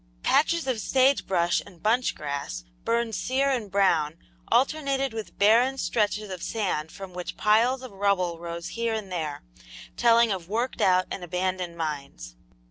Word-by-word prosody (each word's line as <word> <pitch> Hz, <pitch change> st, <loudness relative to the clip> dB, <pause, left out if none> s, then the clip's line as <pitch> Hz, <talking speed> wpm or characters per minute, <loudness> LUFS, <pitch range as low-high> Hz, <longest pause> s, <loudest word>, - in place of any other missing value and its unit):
Patches 315 Hz, +4 st, +2 dB
of 255 Hz, -4 st, -1 dB
sage 265 Hz, +4 st, +2 dB
brush 175 Hz, -2 st, +2 dB
and 180 Hz, -5 st, -17 dB
bunch 235 Hz, +4 st, +2 dB
grass, 140 Hz, -, -5 dB, 0.2 s
burned 230 Hz, -1 st, 0 dB
sere 270 Hz, +5 st, +1 dB
and 235 Hz, -6 st, -2 dB
brown, 170 Hz, -6 st, +2 dB, 0.3 s
alternated 275 Hz, -2 st, +1 dB
with 220 Hz, -1 st, -7 dB
barren 235 Hz, +6 st, +4 dB
stretches 210 Hz, -4 st, -1 dB
of 185 Hz, -2 st, -6 dB
sand 180 Hz, -9 st, -2 dB
from 190 Hz, -1 st, -9 dB
which 180 Hz, 0 st, -6 dB
piles 235 Hz, +5 st, +3 dB
of 255 Hz, -, -8 dB
rubble 190 Hz, -4 st, 0 dB
rose 170 Hz, 0 st, -6 dB
here 230 Hz, -1 st, -1 dB
and 205 Hz, -4 st, -5 dB
there, 155 Hz, -5 st, -4 dB, 0.5 s
telling 235 Hz, -1 st, +5 dB
of 180 Hz, -3 st, -4 dB
worked 235 Hz, +5 st, -2 dB
out 185 Hz, 0 st, +4 dB
and 185 Hz, -, -5 dB
abandoned 180 Hz, 0 st, -2 dB
mines. 140 Hz, -, -5 dB
200 Hz, 155 wpm, -26 LUFS, 175-235 Hz, 0.5 s, telling